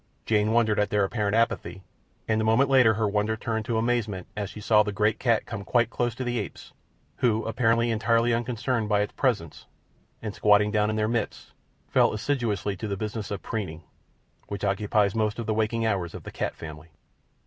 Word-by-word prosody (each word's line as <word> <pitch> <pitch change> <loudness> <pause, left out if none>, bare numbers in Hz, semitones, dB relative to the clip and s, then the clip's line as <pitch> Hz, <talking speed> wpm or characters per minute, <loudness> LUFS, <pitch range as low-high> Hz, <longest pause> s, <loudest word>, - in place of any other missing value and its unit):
Jane 105 0 +2
wondered 110 -2 +2
at 105 - +1
their 105 -1 +2
apparent 105 +1 0
apathy, 95 -5 0 0.4
and 110 0 +1
a - - 0
moment 120 +5 +3
later 125 -5 +6
her 110 -1 +1
wonder 105 +2 0
turned 110 -1 -3
to 115 -2 -1
amazement 110 -5 -1
as 105 -1 -3
she 105 - -9
saw 105 +1 +4
the 105 0 -1
great 105 +2 +1
cat 115 -3 +2
come 110 -4 -6
quite 120 +4 +1
close 120 -2 -1
to 130 - -4
the 120 -1 -1
apes, 100 - -8 0.4
who 115 -2 +1
appeared 115 0 +2
entirely 115 0 +2
unconcerned 120 -1 -1
by 105 -1 +3
its 105 - -3
presence, 105 - -1 0.5
and, 105 -2 -5
squatting 105 0 +4
down 105 -1 +2
in 110 - -1
their 110 0 +1
midst, 115 -2 -3 0.4
fell - - +3
assiduously 110 -4 -1
to 110 - -4
the 100 -1 -3
business 105 0 -4
of 100 - -5
preening, 90 -7 -4 0.6
which 100 0 -6
occupies 100 0 +1
most 110 -1 0
of 115 - -4
the 110 - 0
waking 110 +1 0
hours 95 -6 -1
of - - -8
the - - -8
cat - - -3
family. 80 0 -9
110 Hz, 200 wpm, -26 LUFS, 105-115 Hz, 0.6 s, later